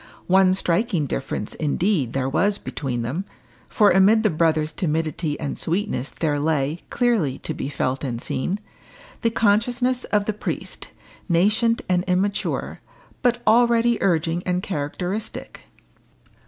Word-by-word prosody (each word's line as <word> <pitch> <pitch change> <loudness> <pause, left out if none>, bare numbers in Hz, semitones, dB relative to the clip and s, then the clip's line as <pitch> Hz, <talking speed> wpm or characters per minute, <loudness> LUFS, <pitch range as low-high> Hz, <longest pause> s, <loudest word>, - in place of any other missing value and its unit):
One 185 0 +4
striking 180 -2 0
difference, 135 -6 -3
indeed, 155 - 0
there 130 -1 0
was 200 +9 +2
between 125 -5 -4
them, 140 +11 -3 0.5
for 210 -4 +4
amid 200 +4 +5
the 215 - +3
brother's 155 -1 +1
timidity 155 -2 -2
and 145 - -3
sweetness 170 - -1
there 150 -3 -1
lay, 150 +1 0
clearly 230 - +1
to - - -5
be 135 - -4
felt 135 -1 -2
and 120 -4 -3
seen, 180 +12 -2 0.6
the 230 - +2
consciousness 240 +4 +1
of 205 -1 +1
the 215 - -1
priest 210 - -5 0.4
nascent 210 +7 +2
and 180 -1 +2
immature, 190 +2 -1 0.4
but 245 -2 +1
already 235 +1 +4
urging 165 -2 +1
and 180 0 -1
characteristic. 180 +5 -4
180 Hz, 130 wpm, -23 LUFS, 150-210 Hz, 0.6 s, amid